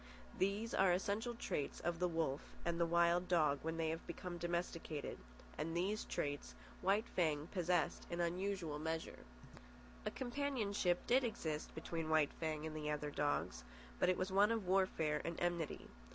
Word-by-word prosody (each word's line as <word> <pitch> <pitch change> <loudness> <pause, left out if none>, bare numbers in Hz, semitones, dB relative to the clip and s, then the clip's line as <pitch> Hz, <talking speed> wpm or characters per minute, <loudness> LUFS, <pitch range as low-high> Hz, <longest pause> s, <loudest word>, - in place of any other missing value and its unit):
These 200 +4 0
are 190 -1 +5
essential 205 +6 0
traits 145 -10 -2
of 170 -1 -1
the 180 - +3
wolf 160 -5 -2
and 170 0 0
the 170 - +3
wild 170 +1 +4
dog 155 -5 +3
when 160 +1 -2
they 160 -1 +1
have 165 +1 -4
become 175 0 -5
domesticated, 170 -3 -2 0.4
and 165 +2 -1
these 200 +5 0
traits 145 - -3 0.3
White 200 +4 +3
Fang 155 -4 +1
possessed 180 -2 +1
in 170 - -3
unusual 175 -3 -1
measure. 160 +1 -3 0.8
A - - 0
companionship 240 -9 0
did 255 +2 +4
exist 160 -10 -2
between 160 0 -3
White 155 -2 +4
Fang 155 -1 -2
and 155 -1 -4
the 150 -1 -2
other 150 0 -1
dogs, 145 - 0 0.4
but - - +4
it 185 - +3
was 185 +1 -1
one 200 +3 +5
of 225 -4 0
warfare 180 -5 +2
and 170 0 -3
enmity. 175 -3 -1
170 Hz, 165 wpm, -39 LUFS, 155-190 Hz, 0.8 s, are